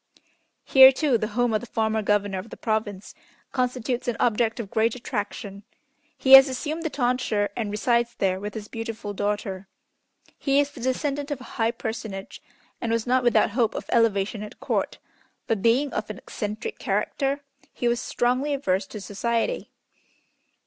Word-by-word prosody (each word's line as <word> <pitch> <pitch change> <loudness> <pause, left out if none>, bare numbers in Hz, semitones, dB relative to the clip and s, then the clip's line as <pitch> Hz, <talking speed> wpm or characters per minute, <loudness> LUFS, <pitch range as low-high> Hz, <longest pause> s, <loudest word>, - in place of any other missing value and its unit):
Here, 265 0 +9
too, 270 -3 +1
the 215 - -1
home 245 -2 +2
of 215 - +1
the 245 - -9
former 220 0 0
Governor 205 -2 +1
of 200 +5 -9
the - - -10
Province 215 -3 -2 0.4
constitutes 250 -1 -1
an 240 -2 -1
object 225 -1 +1
of 205 -4 -6
great 225 0 +2
attraction. 205 -3 -5 0.6
He 265 - 0
has 270 +1 +11
assumed 305 +5 -3
the 320 - -2
tonsure, 245 -6 0
and 220 -3 -2
resides 235 +2 +1
there 190 -1 0
with 210 +2 -6
his 215 -1 -6
beautiful 225 -2 -5
daughter. 205 -1 -3 0.7
He 275 0 +2
is 285 0 +1
the 285 - -11
descendant 280 +3 -1
of 290 -3 -3
a - - -11
high 225 -1 +1
personage, 220 -4 -6 0.4
and 230 - -1
was 230 -1 0
not 255 +1 +2
without 240 -2 +3
hope 230 0 +1
of - - -4
elevation 215 -3 +2
at 210 - -9
Court, - - -1 0.5
but, 225 -4 -1
being 250 +6 +2
of 210 0 -3
an 215 - -6
eccentric 215 - -5
character, 280 0 -1 0.3
he 240 - -2
was 240 0 +1
strongly 255 +4 0
averse 190 -7 0
to 210 - -8
society. 230 - -2
230 Hz, 170 wpm, -25 LUFS, 210-255 Hz, 0.7 s, has